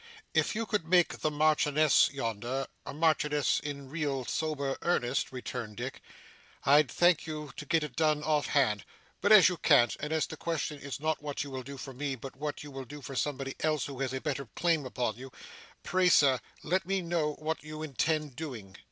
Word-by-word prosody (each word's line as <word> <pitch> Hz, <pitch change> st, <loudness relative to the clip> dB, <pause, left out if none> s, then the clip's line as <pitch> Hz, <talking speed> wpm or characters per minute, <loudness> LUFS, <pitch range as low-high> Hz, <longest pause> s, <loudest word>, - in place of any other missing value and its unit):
'If -, -, +2 dB
you 225 Hz, +1 st, -1 dB
could 205 Hz, -6 st, -1 dB
make 175 Hz, -1 st, +3 dB
the 155 Hz, -, +1 dB
Marchioness 150 Hz, 0 st, +4 dB
yonder, 125 Hz, +1 st, -3 dB, 0.2 s
a -, -, -3 dB
Marchioness, 150 Hz, -1 st, +2 dB
in 140 Hz, -2 st, -6 dB
real, 140 Hz, -3 st, -2 dB
sober 145 Hz, -3 st, -1 dB
earnest,' 135 Hz, -6 st, 0 dB
returned 120 Hz, -4 st, -6 dB
Dick, -, -, -5 dB, 0.6 s
'I'd 145 Hz, 0 st, +5 dB
thank 175 Hz, +4 st, +3 dB
you 150 Hz, -2 st, -5 dB
to 150 Hz, -, -8 dB
get 160 Hz, +1 st, +2 dB
it 145 Hz, -5 st, -6 dB
done 155 Hz, -2 st, +2 dB
off 150 Hz, -1 st, +1 dB
hand. 115 Hz, -8 st, +2 dB, 0.4 s
But 205 Hz, -, +2 dB
as 210 Hz, -4 st, +9 dB
you 180 Hz, -1 st, 0 dB
can't, 135 Hz, -7 st, +4 dB
and 150 Hz, +1 st, -4 dB
as 160 Hz, -1 st, +1 dB
the 160 Hz, -, -8 dB
question 160 Hz, -3 st, -3 dB
is 140 Hz, -3 st, -6 dB
not 155 Hz, 0 st, -1 dB
what 145 Hz, -1 st, -3 dB
you 140 Hz, -, -8 dB
will 130 Hz, -1 st, -4 dB
do 140 Hz, +2 st, -9 dB
for 135 Hz, +1 st, -7 dB
me, 135 Hz, +1 st, -3 dB
but 130 Hz, +2 st, -9 dB
what 145 Hz, +2 st, -4 dB
you 145 Hz, -, -9 dB
will 135 Hz, -1 st, -7 dB
do 145 Hz, +2 st, -10 dB
for 135 Hz, -, -7 dB
somebody 135 Hz, -1 st, -2 dB
else 155 Hz, -3 st, 0 dB
who 135 Hz, -2 st, -7 dB
has 135 Hz, -2 st, -1 dB
a 130 Hz, -, -2 dB
better 140 Hz, -2 st, -3 dB
claim 165 Hz, -6 st, +1 dB
upon 120 Hz, -3 st, -2 dB
you, 130 Hz, +1 st, -9 dB, 0.5 s
pray 185 Hz, 0 st, +3 dB
sir 135 Hz, -6 st, +5 dB, 0.2 s
let 185 Hz, +4 st, +1 dB
me 195 Hz, -1 st, 0 dB
know 165 Hz, -3 st, 0 dB
what 155 Hz, +1 st, -4 dB
you 155 Hz, 0 st, -7 dB
intend 150 Hz, -1 st, -1 dB
doing. 120 Hz, -11 st, -7 dB
145 Hz, 205 wpm, -30 LUFS, 135-155 Hz, 0.6 s, as